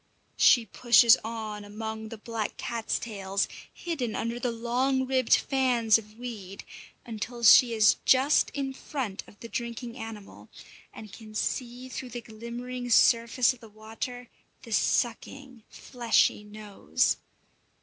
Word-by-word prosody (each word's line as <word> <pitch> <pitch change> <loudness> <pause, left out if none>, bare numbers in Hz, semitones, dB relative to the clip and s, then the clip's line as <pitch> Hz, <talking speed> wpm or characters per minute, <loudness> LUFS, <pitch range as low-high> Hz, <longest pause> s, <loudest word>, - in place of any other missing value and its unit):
She 240 -3 +5
pushes 235 0 +5
on 220 -2 -5
among 220 +1 -6
the 225 - -8
black 220 0 -5
cat's 230 -2 -2
tails, 200 -3 -2 0.2
hidden 260 -10 -4
under 230 +1 -3
the 245 - -1
long 250 +3 0
ribbed 260 -2 +3
fans 245 -5 +2
of 215 0 -16
weed, 215 -6 -8 0.4
until 235 +1 -6
she 235 +1 +7
is 215 -1 +5
just 265 +3 +4
in 270 -1 -3
front 255 -8 -5
of 205 - -18
the 230 - -7
drinking 235 0 -5
animal, 220 -4 -10 0.4
and 215 -3 -12
can 215 -2 -12
see 245 +3 -3
through 255 +1 -7
the 240 0 -6
glimmering 240 +2 -7
surface 235 +2 +4
of 250 - -17
the 225 - -14
water 225 +3 -7 0.4
the 230 - -11
sucking, 245 +3 -1
fleshy 235 -3 +1
nose. 210 -1 -1
230 Hz, 135 wpm, -27 LUFS, 220-250 Hz, 0.4 s, she